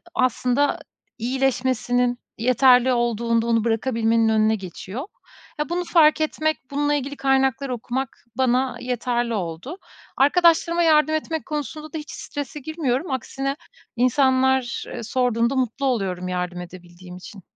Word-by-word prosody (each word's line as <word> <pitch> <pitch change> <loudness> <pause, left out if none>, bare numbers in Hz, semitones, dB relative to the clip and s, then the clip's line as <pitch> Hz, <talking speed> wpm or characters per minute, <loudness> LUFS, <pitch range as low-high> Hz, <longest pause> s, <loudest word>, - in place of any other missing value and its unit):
aslında 255 +1 +1 0.4
iyileşmesinin, 245 -1 0 0.2
yeterli 250 +1 +4
olduğunda 235 -1 0
onu 230 -1 +2
bırakabilmenin 225 -1 +1
önüne 220 0 +3
geçiyor. 190 - -7 0.5
Ya, 300 - -2
bunu 355 +1 -1
fark 315 -3 +4
etmek, 310 0 0
bununla 290 +1 +1
ilgili 285 0 -3
kaynaklar 270 0 +1
okumak 250 +2 -4
bana, 260 0 +2
ııı, - - -10
yeterli 240 -1 -1
oldu. 185 - -4 0.4
Arkadaşlarıma 335 +3 +4
yardım 310 -1 +4
etmek 320 0 -3
konusunda 305 +1 -5
da - - -3
hiç 300 - -8
strese 290 +1 -6
girmiyorum. 290 0 -2
Aksine 270 +2 -3 0.4
insanlar, 260 0 +2
ııı, - - -5
sorduğunda 240 +1 +1
mutlu 260 +2 -1
oluyorum 190 -8 -1
yardım 180 -1 -3
edebildiğim 180 0 -11
için. 185 0 -12
255 Hz, 125 wpm, -23 LUFS, 230-285 Hz, 0.5 s, yeterli